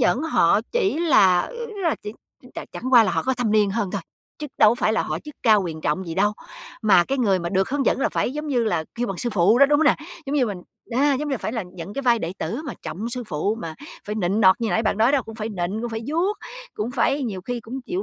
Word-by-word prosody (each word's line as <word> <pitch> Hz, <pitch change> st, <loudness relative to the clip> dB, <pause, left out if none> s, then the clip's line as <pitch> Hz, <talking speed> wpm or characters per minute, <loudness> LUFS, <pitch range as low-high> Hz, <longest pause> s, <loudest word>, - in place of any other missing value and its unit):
dẫn 250 Hz, +1 st, +2 dB
họ 215 Hz, -, +3 dB
chỉ 405 Hz, -9 st, +1 dB
là, 195 Hz, -, +5 dB
ớ, -, -, -6 dB, 0.3 s
là 330 Hz, -, +2 dB
chỉ 210 Hz, -, -6 dB
ch 250 Hz, -, -24 dB
chẳng -, -, -6 dB
chẳng 255 Hz, +2 st, -5 dB
qua 235 Hz, -2 st, +8 dB
là -, -, 0 dB
họ -, -, 0 dB
có 260 Hz, -, 0 dB
thâm 245 Hz, -3 st, -1 dB
niên 210 Hz, -2 st, +3 dB
hơn 205 Hz, -2 st, -2 dB
thôi, 200 Hz, -, -2 dB, 0.4 s
chứ 300 Hz, -, -5 dB
đâu 215 Hz, -, +7 dB
có -, -, +1 dB
phải 220 Hz, -, +1 dB
là -, -, +1 dB
họ 155 Hz, -, -3 dB
chức 300 Hz, -, -11 dB
cao 215 Hz, -4 st, +5 dB
quyền 160 Hz, -3 st, -5 dB
trọng 155 Hz, +5 st, -1 dB
gì 165 Hz, -, -5 dB
đâu. 205 Hz, +3 st, +2 dB, 0.5 s
Mà 195 Hz, -5 st, +5 dB
cái 275 Hz, +7 st, -2 dB
người 200 Hz, -7 st, +2 dB
mà 170 Hz, -, -3 dB
được 190 Hz, +5 st, 0 dB
hướng 280 Hz, -1 st, -1 dB
dẫn -, -, +2 dB
là -, -, +2 dB
phải, -, -, -1 dB
giống 300 Hz, +2 st, -5 dB
như 250 Hz, -5 st, +1 dB
là, 175 Hz, -7 st, 0 dB
kêu 240 Hz, +1 st, -2 dB
bằng 195 Hz, -, -4 dB
sư 240 Hz, -, -2 dB
phụ 205 Hz, +4 st, +3 dB
đó, 280 Hz, -, +7 dB
đúng 290 Hz, +1 st, +3 dB
hông 320 Hz, -, +3 dB
nè? 285 Hz, -, +4 dB, 0.3 s
Giống 275 Hz, -, -2 dB
như 260 Hz, -4 st, +3 dB
mình, 205 Hz, -4 st, -4 dB, 0.3 s
a, 275 Hz, +4 st, +2 dB
giống 295 Hz, +3 st, -3 dB
như -, -, -2 dB
là 265 Hz, -, -1 dB
phải 220 Hz, -, -4 dB
là 225 Hz, -, -2 dB
nhận 180 Hz, +3 st, -8 dB
cái 275 Hz, -, -3 dB
vai 240 Hz, -2 st, +3 dB
đệ 170 Hz, -3 st, -4 dB
tử 240 Hz, +7 st, -3 dB
mà 280 Hz, -, -5 dB
trọng 170 Hz, +8 st, -5 dB
sư 250 Hz, +1 st, -3 dB
phụ 200 Hz, +6 st, -1 dB
mà 160 Hz, -1 st, -5 dB, 0.3 s
phải 210 Hz, -, -4 dB
nịnh 200 Hz, 0 st, 0 dB
nọt 190 Hz, +3 st, +5 dB
như 230 Hz, -, 0 dB
nãy 225 Hz, -, +1 dB
bạn 215 Hz, -2 st, 0 dB
nói 230 Hz, +5 st, +4 dB
đó 280 Hz, -3 st, +2 dB
cũng 225 Hz, -, -10 dB
phải 220 Hz, 0 st, -4 dB
nịnh, 195 Hz, 0 st, -3 dB
cũng 240 Hz, -, -3 dB
phải 225 Hz, 0 st, -4 dB
vuốt, 350 Hz, +7 st, 0 dB, 0.4 s
cũng 215 Hz, +3 st, -3 dB
phải 275 Hz, +3 st, +1 dB
nhiều 210 Hz, -7 st, -3 dB
khi 245 Hz, +4 st, -4 dB
cũng 240 Hz, +4 st, -7 dB
chịu 365 Hz, +3 st, -2 dB
225 Hz, 295 wpm, -23 LUFS, 195-265 Hz, 0.5 s, qua